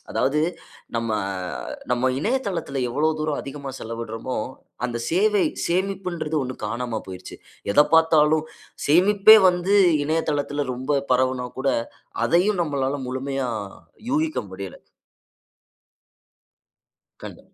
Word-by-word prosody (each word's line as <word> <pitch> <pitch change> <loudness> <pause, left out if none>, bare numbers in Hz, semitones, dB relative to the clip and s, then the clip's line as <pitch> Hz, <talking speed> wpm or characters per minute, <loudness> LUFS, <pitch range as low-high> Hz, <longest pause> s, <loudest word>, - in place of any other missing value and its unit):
அதாவது 145 +3 +1 0.5
நம்ம, 115 -1 -1 0.8
நம்ம 125 0 +1
இணையதளத்துல 185 - -2
எவ்ளோ 150 +6 +1
தூரம் 155 -1 -1
அதிகமா 140 0 -7
செலவிடறோமோ, 115 +2 -5 0.5
அந்த 120 -1 -2
சேவை 205 +3 +3 0.2
சேமிப்புன்றது 180 -3 -2
ஒண்ணு 130 0 -4
காணாம 115 0 -3
போயிருச்சு. 95 -1 -9 0.4
எத 145 - +6
பார்த்தாலும் 155 -1 +4 0.4
சேமிப்பே 195 +7 +7
வந்து 180 +2 +1 0.3
இணையதளத்துல 145 -2 -1
ரொம்ப 140 +3 0
பரவனா 130 0 +1
கூட, 135 - 0 0.6
அதையும் 180 +2 +2
நம்மளால 140 -3 -1
முழுமையா 135 0 -2 0.6
யூகிக்க 310 +2 0
முடியல. 95 0 -7 2.4
கண்ட - - -9
145 Hz, 95 wpm, -23 LUFS, 130-175 Hz, 2.4 s, சேமிப்பே